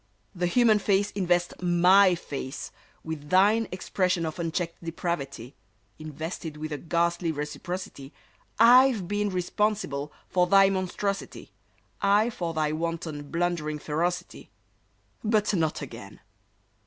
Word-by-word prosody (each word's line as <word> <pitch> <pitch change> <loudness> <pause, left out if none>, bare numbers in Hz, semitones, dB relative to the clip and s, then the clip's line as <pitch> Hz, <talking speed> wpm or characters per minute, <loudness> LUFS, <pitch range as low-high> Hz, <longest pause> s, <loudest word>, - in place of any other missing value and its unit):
The 175 -2 -1
human 220 +1 +4
race 200 0 +2
Invest 175 -2 0
my 180 +2 +5
face 140 -4 -6 0.3
With 155 -2 -6
thine 205 +4 +4
expression 185 -2 -1
of 160 +2 -5
unchecked 170 0 -3
depravity, 145 -7 -4 0.5
Invested 155 +1 -6
with 155 +1 -6
a 145 - -3
ghastly 170 0 0
reciprocity, 150 -1 -6 0.5
I've 240 -3 +6
been 205 +1 0
responsible 180 -5 -1 0.2
for 180 -1 +2
thy 195 +1 +6
monstrosity, 195 +1 -3 0.5
I, 205 +4 +3
for 170 -6 -4
thy 155 -1 0
wanton, 160 -2 -4
blundering 165 -3 -1
ferocity— 175 +4 -3 0.7
But 215 -1 +1
not 160 -5 0
again! - - -10
175 Hz, 115 wpm, -27 LUFS, 155-195 Hz, 0.7 s, I've